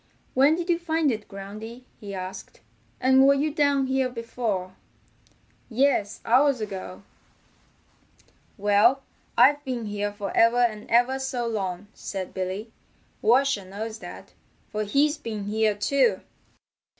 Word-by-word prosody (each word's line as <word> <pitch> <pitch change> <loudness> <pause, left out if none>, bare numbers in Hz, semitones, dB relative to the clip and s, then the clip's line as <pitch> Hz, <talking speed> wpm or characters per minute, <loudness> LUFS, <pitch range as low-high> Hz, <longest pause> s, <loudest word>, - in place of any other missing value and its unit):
"When 275 +4 +5
did 345 0 -4
you 340 -2 +2
find 320 -4 +1
it, 215 -2 -5
Groundy?" 215 +5 -9 0.2
he 200 -3 -7
asked. 185 0 -8 0.4
"And 265 +1 +5
were 280 - +6
you 295 +2 0
down 285 -3 +2
here 265 -1 0
before?" 230 -6 -4 0.9
"Yes, 240 -4 +1
hours 260 +2 +4
ago." 185 - -6 1.5
"Well, 210 +7 +3 0.3
I've 290 0 +5
been 250 -4 -3
here 205 0 -2
for 205 -1 -6
ever 230 +1 +5
and 230 -4 0
ever 245 +3 +3
so 265 -2 -2
long," 195 -4 -3
said 190 -2 -6
Billy. 190 +4 -4 0.5
"Washer 245 -1 +3
knows 215 +4 -6
that, - - -10 0.4
for 215 0 -2
he's 290 +7 +2
been 220 -7 -5
here 215 +1 +1
too." 235 -1 +2
230 Hz, 130 wpm, -25 LUFS, 205-270 Hz, 1.5 s, were